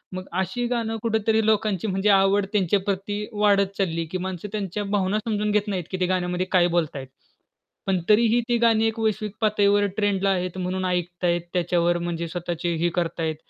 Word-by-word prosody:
मग 185 0 -5 0.2
अशी 190 +7 -2
गाणं 230 -2 -2
कुठेतरी 220 -1 +1
लोकांची 215 -2 +1
म्हणजे 195 +2 +1
आवड 195 +1 +3
त्यांच्या 200 -1 +2
प्रती 200 +1 -3
वाढत 200 -1 +2
चालली 165 -4 -1
की 185 - -1
माणसं 190 +2 -5
त्यांच्या 205 -1 -3
भावना 200 +2 +1
समजून 210 -2 0
घेत 210 0 +1
नाहीत 190 -4 -2
की 185 - -2
ते 185 - +2
गाण्यामध्ये 180 0 -1
काय 180 -2 +4
बोलताहेत. 145 -5 -2 0.8
पण 190 -1 +2
तरीही 230 +2 +5
ती 240 - +3
गाणी 225 -1 +3
एक 225 +1 -3
वैश्विक 215 -1 -1
पातळीवर 205 -1 +3
ट्रेंडला 200 -2 +1
आहेत 185 -1 -1
म्हणून 185 0 -2
ऐकताहेत 175 -1 -1
त्याच्यावर 175 -1 +1
म्हणजे 170 -1 -3
स्वतःची 175 +1 -3
ही 175 - +3
करताहेत. 165 -2 -1
195 Hz, 175 wpm, -24 LUFS, 180-210 Hz, 0.8 s, तरीही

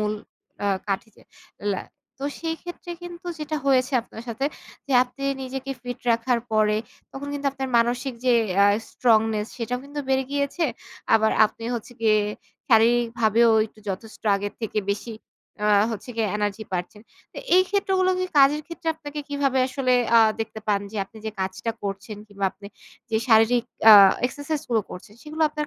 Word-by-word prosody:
মূল 210 0 0 0.5
আ - - +2 0.2
কাঠি 195 +3 -2
চে - - -20 0.5
লা 190 - -3 0.4
তো 275 - -5 0.2
সেইক্ষেত্রে 345 +1 -6
কিন্তু 350 0 -9
যেটা 305 0 -3
হয়েছে 260 0 +3
আপনার 225 - -11
সাথে 235 +5 -1 0.4
যে 275 - -3
আপনি 265 +2 -9 0.2
নিজেকে 265 +1 -5
ফিট 245 -1 -5
রাখার 230 +1 +1
পরে 215 -1 +3 0.4
তখন 285 +1 -6
কিন্তু 285 0 -3
আপনার 265 -1 -4
মানসিক 245 +2 0
যে 250 - +4 0.3
আ - - +6 0.2
স্ট্রংনেস 220 -3 +2
সেটাও 250 +1 -2
কিন্তু 290 +1 -5
বেড়ে 265 0 +2
গিয়েছে। 285 +4 -1 0.5
আবার 220 0 +4 0.2
আপনি 225 +1 -11
হচ্ছে 235 +1 -6
গিয়ে 215 -2 +4 0.5
শারীরিক 235 +1 +4
ভাবেও 225 +1 +4 0.2
একটু 215 - -23
যথেষ্ট 205 +3 -6
আগের 205 +1 -4
থেকে 220 -1 -2
বেশি 225 +3 -6 0.5
আ - - +3 0.2
হচ্ছে 225 +3 -6
গিয়ে 220 -2 +1
এনার্জি 210 +1 -2
পাচ্ছেন। 180 +4 -4 0.3
তো - - -8 0.2
এই 370 - +7
ক্ষেত্রগুলোকে 370 -2 +1
কাজের 285 +2 +5
ক্ষেত্রে 335 -1 -6
আপনাকে 295 -1 -7
কিভাবে 280 -2 0
আসলে 255 -1 0 0.2
আ - - +9 0.2
দেখতে 220 0 -5
পান 200 -1 +2
যে - - -6
আপনি 220 +2 -15
যে - - -1
কাজটা 190 +4 -2
করছেন 200 +1 -5
কিংবা 200 -1 -5
আপনি 200 - -13 0.4
যে 220 - +2
শারীরিক 225 +2 +5 0.3
আ - - +12 0.3
এক্সারসাইজ 285 +3 -4
গুলো 225 -2 +3
করছেন 200 +3 -10
সেগুলো 310 +1 -3
আপনার 300 0 -4
240 Hz, 165 wpm, -24 LUFS, 220-285 Hz, 0.5 s, আ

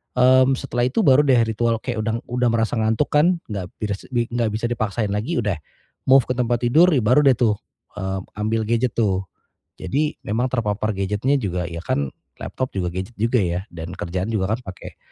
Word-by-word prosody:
mmm, 130 +1 +5
setelah 120 -1 -1
itu 215 - 0
baru 135 -5 +6
deh 125 -3 +5
ritual 115 0 -1
kayak 125 -3 -3
udah 110 +1 -1 0.2
udah 125 0 +1
merasa 115 0 0
ngantuk 110 +6 +1
kan 170 +4 +3
enggak 95 -4 -4
bisa 105 -1 -1
sed - - -32
enggak 120 -1 0
bisa 110 - -2
dipaksain 110 -2 -1
lagi, 110 +12 -2
udah 105 -6 -2 0.5
move 135 0 +7
ke - - +2
tempat 120 -1 0
tidur 160 +9 +5
baru 125 +4 +4
deh 135 -2 +6
tuh, 115 -4 +3 0.5
eee, 95 0 -2 0.2
ambil 110 +1 0
gadget 120 +2 +1
tuh. 100 -5 +2 0.6
Jadi 150 +12 -1
memang 115 +5 0
terpapar 110 -3 -1
gadget-nya 105 +8 0
juga 90 -6 -2
ya 85 0 -6
kan 70 -1 0 0.3
laptop 130 0 -3
juga 90 -2 -1
gadget 95 +5 -5
juga 115 +3 +2
ya 85 +1 -1
dan 85 0 -7
kerjaan 90 +2 -3
juga 100 0 0
kan - - -13
pake - - -11
115 Hz, 190 wpm, -22 LUFS, 100-125 Hz, 0.6 s, move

